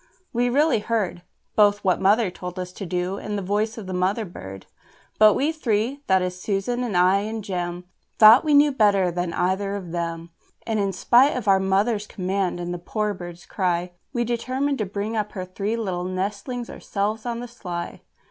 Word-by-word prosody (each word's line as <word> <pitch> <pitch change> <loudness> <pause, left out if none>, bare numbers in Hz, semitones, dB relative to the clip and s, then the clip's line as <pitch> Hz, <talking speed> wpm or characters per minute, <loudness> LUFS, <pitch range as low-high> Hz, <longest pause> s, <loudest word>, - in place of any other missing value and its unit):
We 245 +1 +1
really 290 -1 +3
heard 210 -5 -2 0.3
Both 205 -1 +4
what 185 -2 +2
Mother 205 +1 +3
told 180 0 -8
us 180 0 -4
to 195 0 -7
do, 180 +2 -2
and 210 0 -4
the 200 - -3
voice 210 +4 -1
of 220 - -7
the 185 - -5
mother 190 +5 0
bird. 95 - -9 0.5
But 215 -1 +7
we 295 +4 +1
three 255 -2 -1
that 190 -1 +3
is 180 0 -4
Susan 215 +6 -1
and 215 -7 -1
I 185 +2 +5
and 215 +1 -4
Jem 175 -3 -3 0.3
Thought 220 +3 +9
we 300 -2 +3
knew 290 +1 +6
better 200 -7 +3
than 175 0 -2
either 190 +3 0
of 185 -4 -6
them: 170 -1 -4 0.3
And 220 -2 -1
in 200 -1 +1
spite 245 +9 +4
of 230 -4 -5
our 195 -1 +5
mother's 205 +3 +1
command 190 -1 -2
and 175 0 -3
the 175 - -5
poor 210 +4 -2
bird's 175 -2 -9
cry, 180 -2 -1 0.2
We 240 -3 0
determined 255 +4 -1
to 215 - -1
bring 205 +3 -3
up 210 -1 -2
her 185 -3 -4
three 200 +4 -3
little 185 -5 -2
nestlings 205 +6 -3
ourselves 215 +3 -3
on 235 -1 -2
the 245 - -6
sly. 180 -8 -6
200 Hz, 195 wpm, -24 LUFS, 180-225 Hz, 0.5 s, Thought